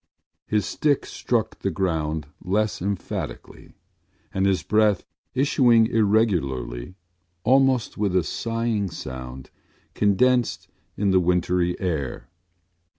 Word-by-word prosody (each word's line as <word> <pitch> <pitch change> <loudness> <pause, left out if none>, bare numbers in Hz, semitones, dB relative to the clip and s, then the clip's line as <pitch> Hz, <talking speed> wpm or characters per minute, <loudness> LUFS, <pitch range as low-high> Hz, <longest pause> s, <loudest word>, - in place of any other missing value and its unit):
His 105 -2 +1
stick 145 -3 0
struck 115 -3 -2
the 95 - -1
ground 80 -5 -1 0.2
less 105 +3 0
emphatically 100 0 -5 0.6
and 95 0 +1
his 95 -5 +1
breath, 105 +1 +2 0.3
issuing 125 -4 +4
irregularly, 90 - 0 0.5
almost 130 -2 +3
with 100 -3 0
a 90 - +3
sighing 115 +1 -2
sound, 65 -4 -8 0.4
condensed 120 +4 +2 0.3
in 100 -1 +1
the 95 - +5
wintry 90 0 +1
air. 80 -5 -3
100 Hz, 100 wpm, -24 LUFS, 85-115 Hz, 0.6 s, the